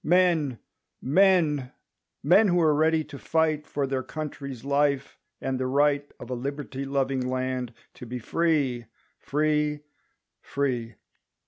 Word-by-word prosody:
Men 165 -7 +3 0.5
who 175 +3 +2
are 155 -3 +4
ready 160 +1 +2
to 140 -2 -10
fight 155 -2 0
For 140 -1 -1
their 135 -1 -1
country's 140 -2 -6
life, 140 -1 0 0.2
and 130 -1 -2
the 130 - -1
right. 145 +1 +2
Of 120 - -9
a - - 0
liberty 140 +1 -4
loving 135 -2 -1
land 130 -1 -2 0.2
to 125 - -10
be 125 +2 -4
Free, 135 -2 0 0.3
free, 150 0 0 0.6
free! 125 -5 -2
140 Hz, 120 wpm, -26 LUFS, 130-155 Hz, 0.6 s, are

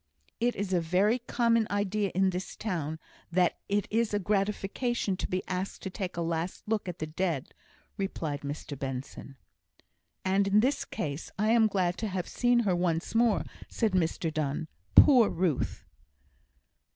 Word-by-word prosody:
"It 240 +1 +1
is 195 -1 -2
a 175 - +3
very 190 +8 +2
common 230 -2 +2
idea 205 0 0
in 190 0 +3
this 180 +1 -5
town, 160 -7 -3 0.3
that 180 0 +2
it 205 0 +1
is 225 -1 +1
a - - +2
gratification 205 +2 0
to - - -3
be 185 0 -2
asked 185 +1 -3
to 190 - -4
take 185 -3 -5
a 170 - 0
last 165 +4 -3
look 210 -3 -1
at 175 - -6
the 155 - -3
dead," 160 -3 -2 0.4
replied 160 -7 -3
Mr 145 0 -5
Benson. 135 0 -6 0.9
"And 195 +1 +3
in 200 +2 +5
this 270 +5 +1
case 145 0 -4
I 215 +2 +2
am 230 -1 +5
glad 185 -4 0
to 220 - -1
have 185 -3 -3
seen 245 -1 +2
her 195 -5 +1
once 170 -2 -1
more," 230 -2 +3 0.3
said 225 -3 0
Mr 165 -2 0
Donne. 155 +1 -2 0.3
"Poor 250 -7 +8
Ruth!" 165 -5 -1
190 Hz, 165 wpm, -29 LUFS, 165-215 Hz, 0.9 s, Poor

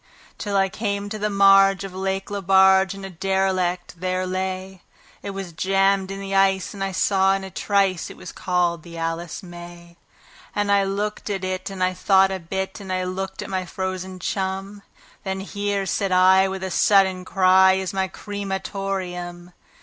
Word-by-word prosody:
Till 205 -2 -1
I 195 0 +3
came 200 0 -3
to 215 +1 -5
the 210 +1 0
marge 195 -1 +5
of 195 -2 -7
Lake 190 +1 -3
Lebarge, 190 0 +4
and 195 -1 -8
a 195 - -7
derelict 185 -1 -1
there 185 +1 -1
lay; 185 0 -4 0.4
It - - -6
was 195 -3 -6
jammed 195 +2 +2
in 195 0 -5
the 195 0 -5
ice, 195 -1 +2
but 200 - -9
I 195 0 -1
saw 195 0 +2
in 195 - -4
a 190 - -8
trice 195 -2 0
it - - -11
was - - -9
called 175 -2 0
the 170 0 -11
"Alice 165 +3 -4
May". 175 -1 -11 0.6
And 205 -1 +1
I 200 -1 +4
looked 205 +2 -3
at 195 -2 -3
it, 185 0 -3
and 190 -2 -3
I 185 0 +1
thought 190 +1 +4
a 190 - -3
bit, 190 +3 -4
and 195 -2 -7
I 185 0 0
looked 190 +1 -4
at - - -8
my 185 -1 -1
frozen 185 0 -5
chum; 195 +2 -3 0.4
Then 190 0 -3
"Here", 200 0 -2
said 195 +1 -1
I, 185 +1 +5
with 190 0 -5
a 190 - -3
sudden 190 -1 +3
cry, 190 0 +5
"is 190 0 -2
my 190 0 0
cre 205 +2 -7
ma 195 -1 -1
tor 195 0 -3
eum." 175 0 -8
190 Hz, 190 wpm, -23 LUFS, 185-195 Hz, 0.6 s, marge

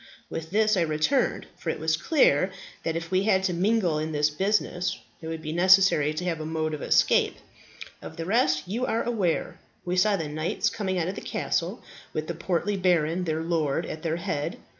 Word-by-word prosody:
With 160 0 -5
this 215 +3 +3
I - - +3
returned, 160 - +1
for 165 - -5
it - - -1
was 160 +1 +1
clear 185 - +3 0.3
that 165 - -2
if 165 +1 -4
we 185 0 +3
had 195 -2 +2
to 185 -2 0
mingle 180 -3 +1
in 155 +1 -3
this 150 +1 +2
business 185 +1 0 0.2
it 160 - -7
would 160 -1 -5
be 155 - -4
necessary 185 -4 +5
to 180 - -3
have 170 -3 -1
a - - -4
mode 155 -1 -2
of 150 - -5
escape. - - +3 0.7
Of - - -9
the 165 - -4
rest 165 -7 +2
you 225 +7 -2
are 230 +1 0
aware. 205 -9 -1 0.3
We 180 0 -1
saw 200 +3 +3
the 160 -4 -3
knights 155 +7 -1
coming 190 -3 -2
out 170 -1 0
of 185 - -2
the - - -7
castle, - - -2 0.3
with 155 - -2
that 170 0 -6
portly 190 +3 -1
baron, 180 -1 +1
their 160 -1 -1
lord, 165 -2 0
at 155 - -6
their 165 -1 -1
head. 150 -3 -3
170 Hz, 205 wpm, -26 LUFS, 155-190 Hz, 0.7 s, necessary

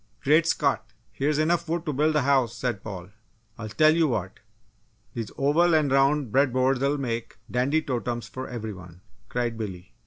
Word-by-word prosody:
"Great 155 +4 +4
Scott! - - 0 0.2
Here's 145 +2 0
enough 170 +2 +1
wood 170 0 -1
to 150 - -2
build 155 +3 +1
a 150 - +3
house!" 130 -4 +2
said 120 -6 -2
Paul. 95 -4 -7 0.5
"I'll 110 -1 -5
tell 155 +7 +4
you 165 -1 +3
what! 125 - -3 0.7
These 115 -3 -4
oval 160 +5 +3
and 150 -3 +2
round 135 -2 +2
bread 135 +1 +3
boards'll 135 +3 +1
make 115 -5 -4
dandy 140 +6 +1
totems 120 -4 -3
for 130 0 -7
every 110 -3 -5
one!" 90 -1 -13 0.3
cried 120 -2 -2
Billy. 95 -2 -7
130 Hz, 175 wpm, -26 LUFS, 115-150 Hz, 0.7 s, Great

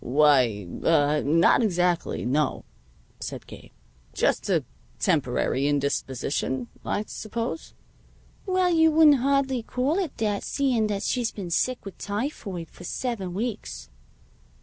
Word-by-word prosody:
"Why 125 -8 +3 0.2
ah 150 -2 +3
not 165 - +4
exactly; 180 -5 0
no," 145 +5 0 0.5
said - - -6
Gabe. - - -12 0.5
"Just - - +1
a - - +2 0.3
temporary 135 +2 +1
indisposition, 135 -2 -1
I 205 - -1
suppose?" 230 +8 -5 0.7
"Well, 370 -1 +2
you 320 -1 +5
wouldn't 310 -2 +6
hardly 270 -1 +1
call 260 - -1
it 355 -7 -3
that, 210 -2 0
seeing 250 -6 +1
that 205 -1 -2
she's 240 0 0
been 185 -4 -7
sick 255 +8 0
with 195 - -9
typhoid 205 - -4
for - - -13
seven 195 -3 -3
weeks." 185 - -4
200 Hz, 125 wpm, -26 LUFS, -, 0.7 s, wouldn't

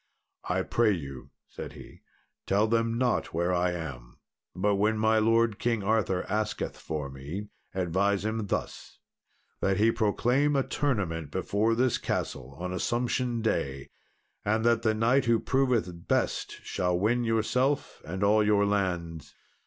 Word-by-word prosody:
"I - - +1
pray 115 -3 +2
you," 70 -7 -7 0.2
said - - -8
he, - - -13 0.5
"tell 100 +2 +3
them 115 +1 +1
not 125 -8 0
where 85 +2 +1
I 90 0 +1
am, 70 -8 -7 0.4
but 100 +2 +1
when 110 +2 +2
my 110 0 +3
lord 115 -1 +2
King 115 -4 0
Arthur 100 -3 +1
asketh 105 0 -2
for 75 -3 -4
me, 75 +10 -7 0.3
advise 95 +3 +1
him 110 -1 -2
thus - - -4 0.6
that 95 -1 +1
he 110 +2 +4
proclaim 120 +6 +2
a 135 - +3
tournament 95 - -1
before 105 +7 0
this 125 +1 +2
castle 65 +1 -3
on 90 +1 -3
Assumption 120 +3 -1
Day, 70 -11 -2 0.5
and 110 +2 +1
that 120 0 +4
the 110 -2 +1
knight 120 +5 +3
who 115 -1 +3
proveth 120 -11 0
best - - 0
shall 90 -1 0
win 115 +6 +1
yourself 125 +5 0
and 95 +4 -4
all 105 +1 +4
your 105 -1 +3
lands." 90 -5 -2
105 Hz, 145 wpm, -28 LUFS, 90-115 Hz, 0.6 s, he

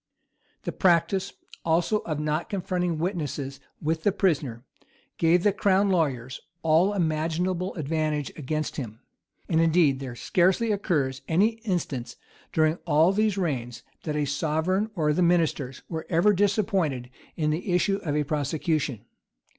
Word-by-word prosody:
The - - -3
practice, 190 +2 +2 0.3
also, 170 +6 +2
of 155 -6 -4
not 150 +2 -1
confronting 180 -3 -1
witnesses 150 -6 -3 0.2
with 160 +1 -1
the 205 - +3
prisoner, 140 - 0 0.5
gave 170 +2 +4
the 205 - +3
crown 200 0 +2
lawyers 130 -8 0 0.2
all 165 +5 +4
imaginable 170 +1 -1
advantage 155 -2 -1
against 155 +1 -3
him. 115 -6 -6 0.5
And 160 0 +2
indeed 165 -5 +3
there 130 -3 -6
scarcely 190 - +2
occurs 150 -10 0
an 170 +4 +3
instance 190 - -2 0.4
during 155 +1 +2
all 160 +3 +5
these 210 -1 +1
reigns, 125 -10 -2 0.2
that 155 - -3
the 150 -1 +1
sovereign 160 +8 0
or 150 -4 +2
the 180 - 0
ministers 165 -7 +1
were 160 -2 -5
ever 180 +5 +4
disappointed 190 - 0 0.2
in 155 -2 0
the 180 +5 -2
issue 195 +3 +2
of 155 -7 -3
a 150 - +2
prosecution. 145 -4 -1
160 Hz, 140 wpm, -26 LUFS, 150-185 Hz, 0.5 s, all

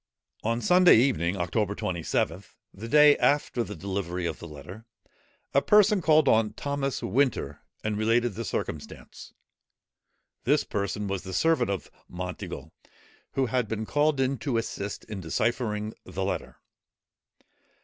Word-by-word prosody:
On 115 +2 0
Sunday 180 +6 +6
evening, 100 - +2
October 100 +3 -1
27th, 85 0 -2 0.2
the 110 +4 -8
day 150 +2 +7
after 145 -4 +2
the 105 -2 -7
delivery 90 -1 -3
of 80 -2 -3
the 85 - -8
letter, 90 +9 -11 0.7
a 140 - +4
person 210 +1 +5
called 155 -2 +4
on 110 -1 +3
Thomas 140 -3 -3
Winter, 110 - 0 0.2
and 110 -1 -1
related 115 +1 +2
the 115 +4 -5
circumstance. - - -6 1.1
This 145 +4 +3
person 100 0 -3
was 95 -2 -2
the 95 0 -8
servant 160 - +2
of 100 -3 -4 0.2
Monteagle, 90 -4 -6 0.6
who 135 - +1
had 125 -1 0
been 110 0 -3
called 145 +3 +1
in 130 -1 0
to 135 -6 -1
assist 105 -3 -4
in 105 -3 -7
deciphering 110 +4 -1
the 95 +1 -4
letter. 95 - -3
110 Hz, 140 wpm, -27 LUFS, 95-135 Hz, 1.1 s, day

